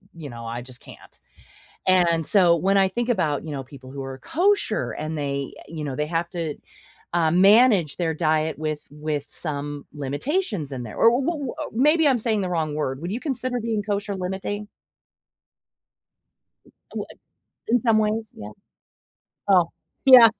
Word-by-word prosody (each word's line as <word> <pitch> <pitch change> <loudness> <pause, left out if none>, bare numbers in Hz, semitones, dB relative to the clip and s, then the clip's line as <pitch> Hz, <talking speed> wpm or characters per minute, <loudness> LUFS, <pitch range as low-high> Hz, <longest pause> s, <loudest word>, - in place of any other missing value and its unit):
you 155 -4 -8
know, 115 -1 -8
I 115 +1 -4
just 125 0 -12
can't, - - -15 0.7
and 170 -4 +3
so 175 -4 +5
when 195 +3 +2
I 190 - +4
think 235 +5 -2
about, 155 - 0
you 160 - -6
know, 135 -2 -4
people 130 -1 -13
who 140 - -5
are 135 0 -6
kosher 395 - +1
and 155 +1 -4
they, 140 -1 -2 0.2
you 155 -1 -5
know, 135 -3 -4
they 150 0 -1
have 170 +1 -1
to, 165 -5 -3 0.6
um, 170 +1 +3
manage 205 - +5
their 165 -2 0
diet 155 -1 +1
with 155 -1 -2
with 150 -1 -3
some 145 -2 -5
limitations 150 - -2
in 130 -2 -4
there 110 -3 -8
or 230 - +6
wh 245 +3 +2 0.3
what - - -6 0.2
maybe 300 +6 +4
I'm 265 - +4
saying 220 -2 0
the 185 - -2
wrong 160 -4 -1
word, 140 -2 -2
would 175 +3 -3
you 240 - -3
consider 255 -3 -2
being 220 -2 -1
kosher 205 0 -2
limiting? 190 +3 -4 2.3
Well - - -3
I - - -16 0.5
In 240 0 +3
some 225 -3 +3
ways, 215 +1 +1
yeah. 105 0 -9 1.0
Oh, 180 -4 +5 0.4
yeah. 250 -3 +10
170 Hz, 170 wpm, -24 LUFS, 145-215 Hz, 2.3 s, yeah